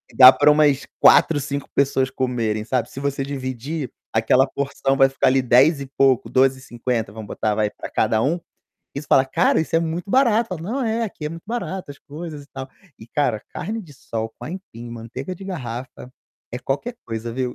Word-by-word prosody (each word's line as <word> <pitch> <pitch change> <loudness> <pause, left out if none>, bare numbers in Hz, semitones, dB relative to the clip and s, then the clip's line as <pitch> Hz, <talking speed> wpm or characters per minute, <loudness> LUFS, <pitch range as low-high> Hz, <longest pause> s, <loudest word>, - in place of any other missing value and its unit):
dá 130 0 +11
para 150 +2 +5
umas 150 -2 +3
4, 155 -3 +6
5 140 0 -4
pessoas 135 -2 +2
comerem, 115 -5 -1
sabe. 125 -1 -1
Se 135 - -7
você 140 -1 -2
dividir, 135 +1 -4 0.2
aquela 115 +4 +4
porção 135 0 -1
vai 135 -1 +6
ficar, 135 - +1
ali, 135 0 +3
R$10 135 +5 +4
e 135 - -6
pouco, 135 -3 +3
R$12,50, 125 -4 0
vamos 110 0 -8
botar, 105 -1 -1
vai, 105 -1 +1
para - - -8
cada 110 0 +1
um. 145 +7 +2 0.6
Aí 140 - -3
você - - -14
fala: 135 - +5
"Cara, 130 - +2
isso 160 - -1
é - - +3
muito 170 +4 -3
barato", 235 -4 +3
falam: 170 -2 -5
"Não, 255 +7 -2
é, 225 +1 0
aqui 160 -7 -6
é - - -1
muito 165 +1 -9
barata 190 -8 -4
as - - -18
coisas 150 0 -8
e - - -23
tal". 135 0 -7 0.3
E, 110 - -12
cara, 130 -6 0
carne-de-sol, 145 - -5
com - - -9
aipim, 150 -10 -8
manteiga 120 +8 -6
de 195 - -11
garrafa 125 -7 -6 0.4
é 125 - -3
qualquer 145 - -3
coisa, 115 +1 -5
viu? 125 0 -2
135 Hz, 195 wpm, -22 LUFS, 125-160 Hz, 0.6 s, dá